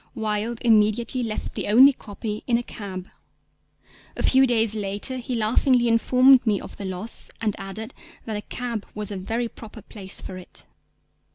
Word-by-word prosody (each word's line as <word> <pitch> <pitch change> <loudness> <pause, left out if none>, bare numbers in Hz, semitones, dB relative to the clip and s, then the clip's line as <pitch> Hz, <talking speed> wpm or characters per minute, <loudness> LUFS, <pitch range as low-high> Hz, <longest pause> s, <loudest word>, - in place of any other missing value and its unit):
Wilde 220 0 -2
immediately 225 +2 +2
left 220 -3 -4
the - - -4
only 260 +7 +7
copy 210 -2 -6
in 235 -2 +3
a 240 - -3
cab. 190 -5 -7 1.1
A - - -2
few 265 0 +5
days 225 -3 +3
later 205 +4 -2
he 250 0 -4
laughingly 240 +2 +2
informed 250 +3 +5
me 210 -4 +1
of - - -10
the 200 - -6
loss, 190 +4 -4
and 215 -3 -1
added 195 +3 -7 0.3
that 220 - -4
a 210 - -3
cab 235 -1 -5
was 210 -1 -3
a - - -4
very 225 +6 -2
proper 220 -2 -12
place 195 -3 -1
for 185 - -7
it. 180 - -9
220 Hz, 170 wpm, -24 LUFS, 205-240 Hz, 1.1 s, only